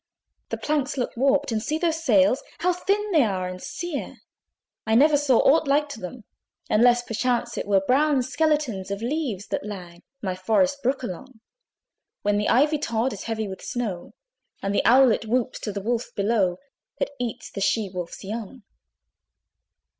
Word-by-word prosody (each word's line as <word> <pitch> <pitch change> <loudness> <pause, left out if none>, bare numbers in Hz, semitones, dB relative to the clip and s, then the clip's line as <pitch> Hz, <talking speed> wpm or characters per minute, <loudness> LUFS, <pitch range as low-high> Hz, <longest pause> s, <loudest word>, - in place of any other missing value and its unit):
The - - -3
planks 290 -2 -1
looked 250 - -2
warped! 275 +2 +2
and 220 -1 0
see 305 +7 -1
those 325 -1 -1
sails, 215 -2 +4 0.2
How 360 +1 +3
thin 405 +3 -1
they 320 -5 +5
are 190 -6 0
and 185 0 -7
sere! 345 -5 -5 0.7
I 220 - +3
never 295 +5 +6
saw 280 -4 +3
aught 305 +2 +4
like 290 +2 +2
to 280 - -7
them, 205 +5 -8 0.5
Unless 240 +2 +5
perchance 240 +1 -1
it - - -4
were 195 -1 +3
"Brown 275 +2 +3
skeletons 285 -8 0
of 200 +2 -4
leaves 245 - -2
that - - -2
lag 180 -4 -8 0.2
My 190 -6 -2
forest 225 +10 +1
brook 260 +2 0
along; 245 +4 -7 0.8
When 205 0 +2
the 210 - 0
ivy 295 +5 +3
tod 235 -2 -1
is 205 - -8
heavy 220 -2 -2
with 190 -1 -7
snow, 215 -8 -4 0.5
And 195 0 -1
the - - +2
owlet 245 -3 +5
whoops 250 +2 0
to 210 - -4
the 200 0 -4
wolf 235 +2 -1
below, 200 -4 +1 0.4
That - - -1
eats 240 -3 -4
the 200 - -5
she 200 +2 +1
wolf's 180 -2 -7
young." 220 +3 -6
240 Hz, 170 wpm, -24 LUFS, 205-280 Hz, 0.8 s, never